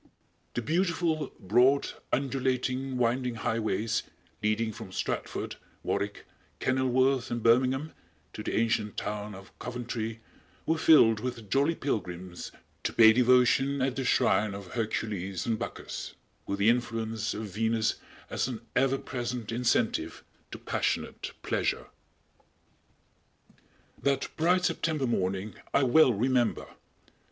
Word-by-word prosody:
The 120 - -1
beautiful, 165 - 0
broad, 125 +8 +3 0.2
undulating, 130 0 0
winding 125 0 +1
highways, 110 0 0 0.4
leading 110 +1 +1
from 95 - -9
Stratford, - - -3 0.3
Warwick, - - -2 0.3
Kenilworth 130 0 +2
and 120 -2 -3
Birmingham 130 +6 +3 0.4
to - - -6
the - - -3
ancient 110 -2 0
town 105 -1 -4
of 95 +1 -12
Coventry 115 -2 -4 0.5
were 160 0 +1
filled 115 -10 +6
with 115 -3 -5
jolly 145 +5 +3
pilgrims 90 - -4 0.3
to - - -1
pay 110 -1 +8
devotion 125 +3 +4
at 130 -1 0
the 135 - -2
shrine 105 -4 +2
of 100 -2 -9
Hercules 105 -5 -2
and 115 -2 0
Bacchus, - - -6 0.3
with 100 - -1
the 100 +2 +4
influence 115 -2 -2
of 110 - -4
Venus 110 +1 +1 0.3
as - - -1
an 120 -4 -5
ever 135 +1 +3
present 120 -4 -4
incentive 120 -1 0 0.3
to - - -7
passionate - - -2
pleasure. - - -1 2.1
That 140 -1 +1
bright 180 +3 +3
September 155 -6 0
morning 95 -3 -1 0.2
I 140 - +5
well 135 +2 +6
remember! 120 +2 +1
120 Hz, 120 wpm, -29 LUFS, 110-130 Hz, 2.1 s, pay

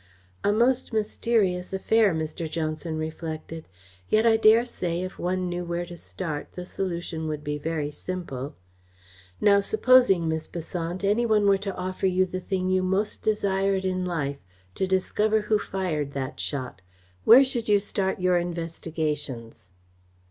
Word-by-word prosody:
"A 205 - +3
most 240 +5 +2
mysterious 210 -4 0
affair!" 210 +2 +3
Mr. 160 0 -3
Johnson 155 0 -3
reflected. 160 0 -5 0.4
"Yet 215 +1 +3
I 225 -1 +6
dare 225 +2 +5
say, 175 -7 -3
if 185 - -7
one 180 +1 -1
knew 175 0 -3
where 175 0 -3
to 175 0 -9
start, 160 -3 -6
the 180 - -6
solution 170 -4 -4
would 150 -1 -4
be 150 0 -3
very 155 -1 -2
simple. 150 -5 -5 0.8
Now, 200 -1 +5
supposing, 215 -4 +4
Miss 160 0 -2
Besant, 170 +2 -4
any 215 +4 +2
one 215 -2 +3
were 200 -1 +4
to 195 -1 -4
offer 185 +1 -2
you 185 0 +3
the 185 0 -4
thing 185 -1 -1
you 185 0 +3
most 190 +3 -1
desired 195 -2 +1
in 185 -1 0
life 145 -6 -2 0.3
to 190 - -1
discover 210 +3 +1
who 210 0 +1
fired 160 -9 -2
that 135 -2 -4
shot, 130 -9 -4 0.4
where 255 +4 +9
should 240 -4 -3
you 205 - +6
start 195 -1 -2
your 180 -1 +3
investigations?" 155 - -4
185 Hz, 155 wpm, -26 LUFS, 160-200 Hz, 0.8 s, where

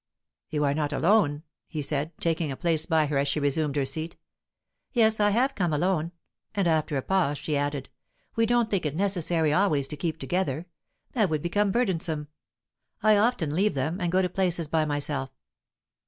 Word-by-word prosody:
"You 150 -1 -1
are 140 -1 +2
not 150 0 -1
alone?" 160 -3 +2 0.2
he 155 -3 -4
said, 150 +2 -1
taking 165 -3 0
a 135 - -5
place 160 -2 +1
by 160 -2 +3
her 145 -1 0
as 140 - +1
she 140 +2 0
resumed 145 0 0
her 140 -2 +1
seat. 160 +5 -4 0.8
"Yes, 220 -3 +3
I 205 0 +4
have 250 +6 +2
come 180 -8 0
alone." 170 +1 0 0.4
And, 200 -3 +1
after 155 -2 +1
a 135 - -2
pause, 180 -7 +1
she 150 - -2
added, 145 -1 -2 0.5
"We 225 0 +2
don't 240 -1 +2
think 195 -4 +1
it 150 -1 -2
necessary 175 -5 +1
always 155 -7 +2
to - - -3
keep 160 +1 -3
together. 155 0 -2 0.5
That 215 -7 +2
would 155 -2 -1
become 200 +3 +1
burdensome. 170 -10 -1 0.7
I 215 0 +6
often 205 -8 +1
leave 200 +2 +2
them, 155 +8 -2
and 175 -1 0
go 185 +1 +3
to - - +2
places 175 -3 0
by 155 0 +1
myself." 145 -2 -2
160 Hz, 185 wpm, -27 LUFS, 145-190 Hz, 0.8 s, I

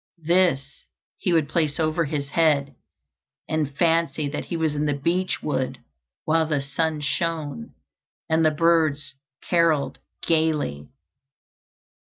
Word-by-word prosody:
This 165 -6 +1 0.3
he 185 - 0
would 160 -3 +3
place 155 -2 0
over 160 +1 +1
his 145 -1 -3
head, 145 -3 +2 0.7
and 150 -3 -2
fancy 165 -3 +2
that 145 - -4
he 170 - -3
was 160 -2 0
in 150 0 -1
the 145 - +1
beech 175 +6 -1
wood 130 -3 -1 0.5
while 160 0 +2
the 150 -2 +1
sun 150 +2 -1
shone, 150 - -3 0.5
and 160 +1 +2
the 155 - +5
birds 155 -3 +2 0.3
carolled 165 -5 +2 0.3
gayly. 155 - 0
155 Hz, 125 wpm, -24 LUFS, 145-165 Hz, 0.7 s, the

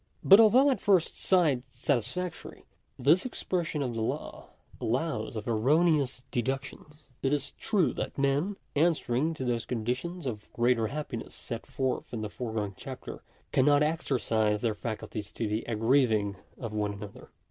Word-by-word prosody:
But 195 +2 +9
although 250 +6 +6
at 245 - -1
first 190 -5 +2
sight 160 -9 +3
satisfactory, 140 - -3 0.3
this 150 +8 +4
expression 175 - -2
of 125 -3 -2
the 115 - -3
law 110 - -4 0.3
allows 120 -2 -1
of 110 - -5
erroneous 140 +3 +2
deductions. 135 +4 -4 0.2
It 135 - +1
is 145 -1 -1
true 200 -6 +1
that - - -4
men, 145 +8 +1 0.2
answering 155 -1 +1
to 130 - -4
those 120 -2 -1
conditions 125 +9 -3
of 110 -5 -5
greatest 120 -2 +2
hap 150 0 -4
piness 115 - -6
set 115 -2 -6
forth 130 -1 -2
in 110 - -3
the 105 - -3
foregoing 110 -4 -3
chapter, - - -8 0.3
cannot 145 +2 +4
exercise 115 -9 0
their 115 -2 +2
faculties 105 -1 -5
to 115 - -2
the 105 +2 -1
aggrieving 115 -3 +2 0.2
of 115 -3 -6
one 105 -1 -1
another. 100 0 -10
130 Hz, 150 wpm, -29 LUFS, 115-155 Hz, 0.3 s, But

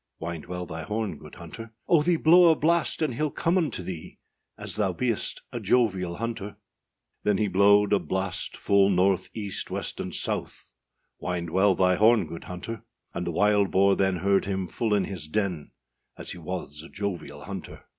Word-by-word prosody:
â 80 - -4
Wind 80 -3 -8
well 90 0 -4
thy 80 -1 -6
horn, 105 0 -3
good 75 -1 -12
hunter; 110 +7 -10
âOh, 160 -4 +4
thee 175 +2 +3
blow 170 +2 +6
a 160 - +5
blast 165 +1 +1
and 150 -5 0
heâll 150 +4 -1
come 170 +2 0
unto 150 - 0
thee, 85 -2 -7 0.4
As - - -3
thou 95 -3 +1
beest 115 +4 -2
a - - -4
jovial 95 -8 +1
hunter.â 110 -1 -4 0.7
Then 105 -2 +2
he 105 - +1
blowed 100 +2 +4
a 100 - +4
blast, 90 +2 -3
full 100 -1 +3
north, 95 0 +2
east, 100 -4 -4
west, - - -4
and - - -4
south, - - -3 0.5
Wind 85 -2 -3
well 95 +2 +4
thy 90 0 +3
horn, 110 -2 +5
good 80 +1 -8
hunter; 95 +5 -6 0.3
And 85 0 -3
the - - 0
wild 105 +2 +3
boar 100 +1 +4
then 95 -1 +1
heard 95 +2 +2
him 95 -2 -2
full 110 +1 0
in 100 - +1
his 90 -6 -6
den, 90 -4 -2 0.5
As - - -6
he 90 - -8
was 80 -4 -5
a 80 - -12
jovial 100 -3 -5
hunter. - - -8
100 Hz, 190 wpm, -26 LUFS, 90-110 Hz, 0.7 s, blow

